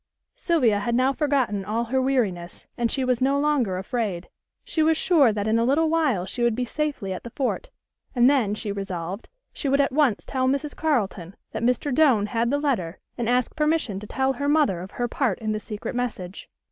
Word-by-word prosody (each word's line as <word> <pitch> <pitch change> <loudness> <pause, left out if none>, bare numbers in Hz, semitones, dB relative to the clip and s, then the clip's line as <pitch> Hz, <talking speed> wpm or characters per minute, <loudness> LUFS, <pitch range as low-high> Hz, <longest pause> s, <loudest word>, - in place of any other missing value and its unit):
Sylvia 255 - +2
had 235 +3 -1
now 260 +2 +3
forgotten 265 -9 0
all 220 +4 -1
her 260 +3 0
weariness, 210 -10 -1
and 235 -1 0
she 265 -2 0
was 250 -1 +1
no 275 +2 +2
longer 280 -10 +1
afraid. 190 -3 -3 0.3
She 320 - -1
was 320 0 +3
sure 315 -11 +4
that 205 0 -2
in 225 +1 +2
a - - +2
little 305 +6 +2
while 290 - +1
she 215 +6 -5
would 235 -2 +2
be 250 +1 -1
safely 280 -8 -3
at 185 - -7
the 235 - -7
fort, 275 - -2 0.5
and 245 0 +5
then, 250 -7 +2
she 215 -1 -4
resolved, 195 -1 -5 0.2
she 280 - -3
would 275 +1 +3
at 280 - +3
once 275 -5 +2
tell 260 -1 -1
Mrs. 280 +2 -1
Carleton 200 - -1 0.2
that - - -4
Mr. 250 +4 +1
Doane 255 -8 +4
had 230 +1 0
the 285 - +1
letter 230 - -1 0.2
and 235 -2 -2
ask 250 0 +1
permission 300 -10 0
to 210 - -9
tell 265 +3 0
her 285 +3 -2
mother 290 - +2
of 185 - -8
her 240 +3 -2
part 240 -5 0
in 215 -1 -3
the 215 - -1
secret 210 +2 -6
message. 210 -7 -4
245 Hz, 210 wpm, -24 LUFS, 205-280 Hz, 0.5 s, and